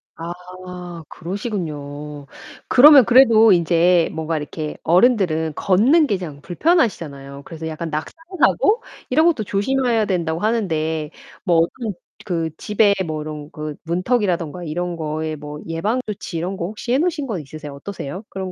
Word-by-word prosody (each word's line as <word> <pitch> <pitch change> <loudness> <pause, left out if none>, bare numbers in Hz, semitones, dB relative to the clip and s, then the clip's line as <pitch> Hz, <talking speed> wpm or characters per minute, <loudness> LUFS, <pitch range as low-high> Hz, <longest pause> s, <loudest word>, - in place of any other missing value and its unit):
아 180 0 -8
그러시군요. 150 - -5 0.4
그러면 280 0 +8
그래도 230 -3 +6
인제 170 0 +3
뭔가 160 0 -2
이렇게 150 +1 -5
어른들은 175 -5 +3
걷는 255 - +4
게 205 -8 0
그냥 155 -6 -8
불편하시잖아요. 170 - 0
그래서 160 -1 -7
약간 160 +1 -5
낙상 155 0 -4 0.3
사고 450 +9 +3 0.3
이런 310 +5 +3
것도 320 -10 +2
조심해야 230 +3 +1
된다고 170 -4 -1
하는데 160 -8 -1 0.3
뭐 175 -4 +3
어떤 210 +7 0 0.3
그 165 -3 -2
집에 210 -1 +3
뭐 155 -1 -3
이런 150 -1 -7
그 150 -1 -6
문턱이라든가 180 - -1
이런 175 +2 -3
거에 155 0 -3
뭐 150 0 -8
예방조치 200 +2 -3
이런 180 +4 -3
거 170 - -3
혹시 220 +4 -4
해 265 - +3
놓으신 325 -3 0
거 220 -8 -3
있으세요? 150 0 -9
어떠세요? 180 +3 -7
그런 190 -1 -5
175 Hz, 335 characters per minute, -20 LUFS, 155-215 Hz, 0.4 s, 그러면